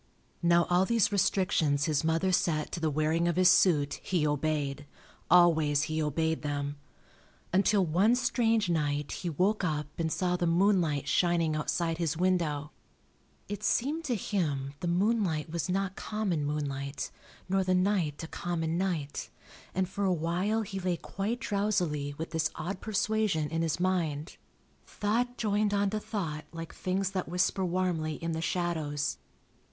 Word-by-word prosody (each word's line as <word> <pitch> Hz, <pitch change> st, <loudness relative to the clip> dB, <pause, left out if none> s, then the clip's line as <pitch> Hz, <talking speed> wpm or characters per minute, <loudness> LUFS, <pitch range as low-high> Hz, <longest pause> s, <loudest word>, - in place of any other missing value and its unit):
Now 170 Hz, 0 st, +4 dB
all 180 Hz, +1 st, +3 dB
these 230 Hz, -1 st, +2 dB
restrictions 180 Hz, -7 st, +2 dB
his 155 Hz, -2 st, +1 dB
mother 165 Hz, +4 st, +1 dB
set 155 Hz, -4 st, +1 dB
to -, -, -3 dB
the 160 Hz, -1 st, +1 dB
wearing 155 Hz, +3 st, +1 dB
of 170 Hz, -, +1 dB
his 180 Hz, 0 st, +6 dB
suit 165 Hz, -6 st, +3 dB
he 175 Hz, -5 st, 0 dB
obeyed, 145 Hz, -1 st, -1 dB, 0.4 s
always 160 Hz, -4 st, +5 dB
he 155 Hz, +1 st, -1 dB
obeyed 160 Hz, +2 st, 0 dB
them, 145 Hz, -1 st, -3 dB, 0.8 s
until 195 Hz, 0 st, +3 dB
one 190 Hz, +9 st, +3 dB
strange 230 Hz, -4 st, +2 dB
night 150 Hz, -3 st, 0 dB
he 175 Hz, -, -3 dB
woke 190 Hz, +7 st, +1 dB
up 150 Hz, -4 st, 0 dB
and 160 Hz, -1 st, 0 dB
saw 180 Hz, +2 st, 0 dB
the 175 Hz, -1 st, 0 dB
moonlight 170 Hz, -4 st, +2 dB
shining 170 Hz, -3 st, +2 dB
outside 165 Hz, +2 st, -1 dB
his 165 Hz, -2 st, -1 dB
window. 165 Hz, -5 st, 0 dB, 0.8 s
It 205 Hz, -1 st, -5 dB
seemed 300 Hz, +7 st, +1 dB
to 250 Hz, -5 st, 0 dB
him 150 Hz, -10 st, -2 dB
the 175 Hz, -, -3 dB
moonlight 180 Hz, -4 st, +1 dB
was 170 Hz, +2 st, -2 dB
not 195 Hz, +1 st, -1 dB
common 195 Hz, -9 st, -2 dB
moonlight, 140 Hz, -2 st, -3 dB, 0.4 s
nor 190 Hz, 0 st, +2 dB
the 185 Hz, 0 st, +2 dB
night 180 Hz, -6 st, +1 dB
a -, -, -5 dB
common 165 Hz, -1 st, -2 dB
night, 165 Hz, -7 st, -2 dB, 0.5 s
and 185 Hz, 0 st, +1 dB
for 200 Hz, +2 st, -4 dB
a 190 Hz, -, +3 dB
while 180 Hz, +6 st, 0 dB
he 195 Hz, -1 st, -5 dB
lay 180 Hz, -2 st, -1 dB
quite 205 Hz, +8 st, -3 dB
drowsily 180 Hz, -, -1 dB
with 160 Hz, +1 st, -5 dB
this 160 Hz, -1 st, +1 dB
odd 185 Hz, +4 st, -4 dB
persuasion 210 Hz, -7 st, 0 dB
in 165 Hz, 0 st, 0 dB
his 165 Hz, 0 st, -1 dB
mind. 170 Hz, -4 st, -1 dB, 0.5 s
Thought 240 Hz, +4 st, -1 dB
joined 210 Hz, -1 st, +1 dB
on 200 Hz, -1 st, +1 dB
to 215 Hz, -, -1 dB
thought 160 Hz, -9 st, -4 dB
like 165 Hz, 0 st, -7 dB
things 190 Hz, +1 st, -1 dB
that 185 Hz, -3 st, -3 dB
whisper 180 Hz, +2 st, +1 dB
warmly 175 Hz, -4 st, -1 dB
in 165 Hz, +2 st, -4 dB
the 160 Hz, 0 st, -2 dB
shadows. 155 Hz, -3 st, -1 dB
175 Hz, 155 wpm, -30 LUFS, 155-195 Hz, 0.8 s, his